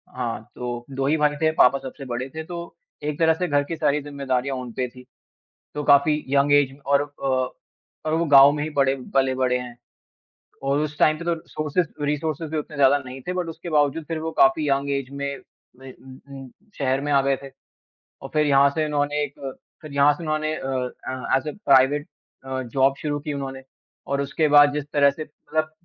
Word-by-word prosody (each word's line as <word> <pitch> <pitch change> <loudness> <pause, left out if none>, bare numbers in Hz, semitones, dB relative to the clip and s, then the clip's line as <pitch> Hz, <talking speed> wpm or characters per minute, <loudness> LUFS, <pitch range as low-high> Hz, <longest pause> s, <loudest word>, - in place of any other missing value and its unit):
हाँ, 115 -3 -4
तो 120 -1 -5
2 135 0 -2
ही 155 +2 +2
भाई 150 -1 +2
थे, 160 0 +3
पापा 140 -3 +4
सबसे 135 +1 -9
बड़े 125 +2 -4
थे 160 - -4
तो 170 0 -8 0.3
एक 150 +1 -3
तरह 160 0 +5
से 180 +3 -2
घर 145 -2 +2
की 165 - -5
सारी 150 -2 +1
ज़िम्मेदारियाँ 140 -2 -2
उन 125 -2 -6
पे 125 -1 -2
थी। 125 0 -15 0.7
तो 150 - -3
काफ़ी 150 +2 +3
यंग 140 +1 +3
ऐज 135 -2 +3
और 140 0 +3
अ 145 -1 -6 0.8
और 155 - +1
वो 170 - +1
गाँव 140 -1 +8
में 150 0 -2
ही 155 - -4
बड़े 135 0 +4 0.2
पले-बड़े 130 -2 +2
हैं 125 -1 -8 0.9
और 140 +1 +1
उस 150 -1 -3
टाइम 155 0 +4
पे 170 - -7
तो 170 - +1
रिसोर्सेज़ 160 +1 -2 0.2
रिसोर्सेज़ 155 +1 -2
भी 155 - -2
उतने 150 0 -6
ज़्यादा 140 +1 +5
नहीं 130 +1 -8
थे, 180 - 0
बट 180 -2 -2
उसके 165 +1 -8
बावजूद 150 +1 +1
फिर 165 -1 -2
वो 160 0 -3
काफ़ी 145 +2 +4
यंग 140 +1 0
ऐज 135 -2 -4
में, 140 -1 -4 0.4
में 130 -1 -10
उम 130 0 -14 0.2
उम, 130 - -11 0.3
शहर 135 -1 +1
में 145 +1 -2
आ 140 - +5
गए 135 0 +1
थे। 140 - -8 0.5
अ, 135 - -14
फिर 150 -1 +3
यहाँ 140 0 +5
से 155 +2 -1
उन्होंने 145 0 0
एक 140 - -8 0.5
फिर 155 - -9
यहाँ 140 +1 +5
से 160 - -10
उन्होंने 155 0 -1
अ - - -7 0.5
अ, 130 0 -1
as 135 +3 -2
a - - -3
private 140 +2 +4 0.4
a, 130 0 -3
job 135 +3 +2
शुरू 145 -1 -1
की 150 0 -4
उन्होंने 135 -1 -5 0.4
और 140 0 -1
उसके 150 +2 0
बाद 145 0 +7
जिस 150 -1 -3
तरह 140 -1 +5
से 155 - -7
मतलब 155 +1 -4
140 Hz, 210 wpm, -23 LUFS, 135-150 Hz, 0.9 s, गाँव